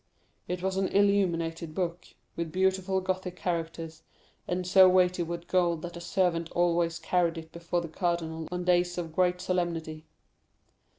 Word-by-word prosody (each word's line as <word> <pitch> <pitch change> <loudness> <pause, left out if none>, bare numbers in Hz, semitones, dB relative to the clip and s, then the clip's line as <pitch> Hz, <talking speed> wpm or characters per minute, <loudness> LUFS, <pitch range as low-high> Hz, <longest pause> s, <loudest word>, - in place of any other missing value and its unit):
It 180 0 -3
was 190 0 -1
an 190 -1 +1
illuminated 170 -5 +1
book, 175 -2 -2 0.3
with 170 -1 -3
beautiful 190 +1 +1
Gothic 185 -1 -3
characters, 165 -2 -4 0.5
and 180 0 -2
so 185 +1 +7
weighty 180 -1 +3
with 170 0 -4
gold, 175 -3 +1
that 175 0 -6
a 170 - -7
servant 170 -2 0
always 170 -1 +1
carried 175 -2 0
it 160 0 -9
before 170 +1 -2
the 170 - -5
cardinal 165 -2 -2
on 180 0 -3
days 175 0 +2
of 165 -2 -4
great 180 -1 +2
solemnity. 170 -4 -2
175 Hz, 155 wpm, -29 LUFS, 165-185 Hz, 0.5 s, so